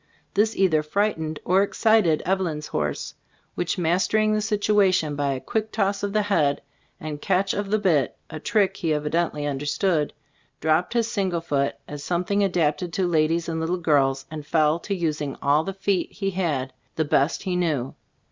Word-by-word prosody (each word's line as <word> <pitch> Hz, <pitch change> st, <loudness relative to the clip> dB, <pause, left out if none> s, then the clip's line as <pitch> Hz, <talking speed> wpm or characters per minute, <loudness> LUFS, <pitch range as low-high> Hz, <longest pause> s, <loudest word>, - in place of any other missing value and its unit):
This 215 Hz, +2 st, +2 dB
either 170 Hz, -5 st, +3 dB
frightened 160 Hz, -2 st, -1 dB
or 185 Hz, +2 st, +4 dB
ex 200 Hz, -, -2 dB
cited 215 Hz, -9 st, +3 dB
Eveline's 175 Hz, -5 st, -1 dB
horse, 75 Hz, -, -3 dB, 0.4 s
which, 175 Hz, +1 st, -2 dB
master 180 Hz, +5 st, +1 dB
ing 215 Hz, 0 st, +3 dB
the 215 Hz, -, +1 dB
situation 205 Hz, -7 st, +2 dB
by 140 Hz, -1 st, 0 dB
a 130 Hz, -, -4 dB
quick 220 Hz, -, -2 dB
toss 200 Hz, -2 st, 0 dB
of 205 Hz, 0 st, -2 dB
the 210 Hz, 0 st, +1 dB
head, 160 Hz, -9 st, +1 dB, 0.4 s
and 150 Hz, -1 st, -6 dB
catch 195 Hz, 0 st, +1 dB
of 205 Hz, -1 st, -3 dB
the 215 Hz, -, +3 dB
bit 165 Hz, -, +1 dB
(a 155 Hz, -, -7 dB
trick 200 Hz, +4 st, +1 dB
he 160 Hz, -4 st, 0 dB
evidently 150 Hz, 0 st, -1 dB
understood), 145 Hz, +3 st, 0 dB, 0.5 s
dropped 160 Hz, +5 st, +1 dB
his 235 Hz, -2 st, +1 dB
single 190 Hz, -6 st, -1 dB
foot 140 Hz, -4 st, -1 dB
as 145 Hz, -1 st, -7 dB
something 180 Hz, +5 st, 0 dB
adapted 170 Hz, -3 st, 0 dB
to 190 Hz, -, +1 dB
ladies 165 Hz, 0 st, +1 dB
and 165 Hz, -1 st, -2 dB
little 165 Hz, +3 st, -1 dB
girls, 135 Hz, -5 st, +2 dB
and 155 Hz, -1 st, -6 dB
fell 155 Hz, 0 st, +2 dB
to 200 Hz, +3 st, -3 dB
us 150 Hz, -1 st, -3 dB
ing 140 Hz, -2 st, -4 dB
all 145 Hz, +2 st, +3 dB
the 195 Hz, -, -3 dB
feet 195 Hz, -1 st, -1 dB
he 195 Hz, -2 st, -2 dB
had, 155 Hz, -8 st, -1 dB, 0.2 s
the 160 Hz, -, 0 dB
best 145 Hz, +2 st, +1 dB
he 185 Hz, -2 st, -1 dB
knew. 155 Hz, -8 st, -1 dB
170 Hz, 185 wpm, -24 LUFS, 150-195 Hz, 0.5 s, or